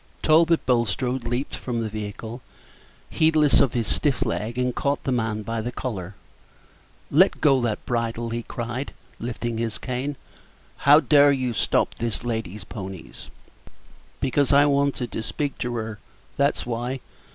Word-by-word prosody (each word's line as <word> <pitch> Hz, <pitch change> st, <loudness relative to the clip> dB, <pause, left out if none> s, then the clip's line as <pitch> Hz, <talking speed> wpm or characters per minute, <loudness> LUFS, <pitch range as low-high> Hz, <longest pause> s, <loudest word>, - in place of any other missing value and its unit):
Talbot 165 Hz, +1 st, +4 dB
Bulstrode 125 Hz, +1 st, 0 dB
leaped 120 Hz, +4 st, -2 dB
from 120 Hz, -2 st, -3 dB
the 110 Hz, -, -2 dB
vehicle, 110 Hz, +3 st, -6 dB, 0.7 s
heedless 155 Hz, -2 st, +4 dB
of 130 Hz, -, +3 dB
his 120 Hz, -2 st, 0 dB
stiff 140 Hz, +1 st, +1 dB
leg, 115 Hz, +3 st, -2 dB
and 125 Hz, 0 st, +1 dB
caught 140 Hz, +3 st, -1 dB
the 135 Hz, -, -1 dB
man 110 Hz, -3 st, -1 dB
by 115 Hz, +1 st, -2 dB
the 120 Hz, +3 st, -3 dB
collar. 100 Hz, -7 st, -5 dB, 1.0 s
"Let 185 Hz, +7 st, +5 dB
go 135 Hz, -4 st, +4 dB
that 115 Hz, -3 st, -2 dB
bridle!" 115 Hz, -1 st, -1 dB
he 120 Hz, 0 st, -2 dB
cried, 120 Hz, +3 st, -5 dB, 0.3 s
lifting 120 Hz, -1 st, -3 dB
his 115 Hz, -2 st, -2 dB
cane; 130 Hz, +3 st, -3 dB, 0.6 s
"how 145 Hz, +2 st, +6 dB
dare 145 Hz, 0 st, +6 dB
you 130 Hz, -3 st, 0 dB
stop -, -, +1 dB
this 115 Hz, -3 st, -2 dB
lady's 110 Hz, -4 st, -3 dB
ponies?" 95 Hz, -3 st, -8 dB, 0.9 s
"Because 135 Hz, +1 st, +1 dB
I 140 Hz, +1 st, +6 dB
wanted 140 Hz, -3 st, +1 dB
to -, -, -3 dB
speak 140 Hz, +5 st, -3 dB
to 120 Hz, -1 st, -2 dB
her, 110 Hz, -2 st, -4 dB, 0.4 s
that's 140 Hz, +1 st, +1 dB
why. 120 Hz, +2 st, -3 dB
120 Hz, 150 wpm, -24 LUFS, 115-140 Hz, 1.0 s, how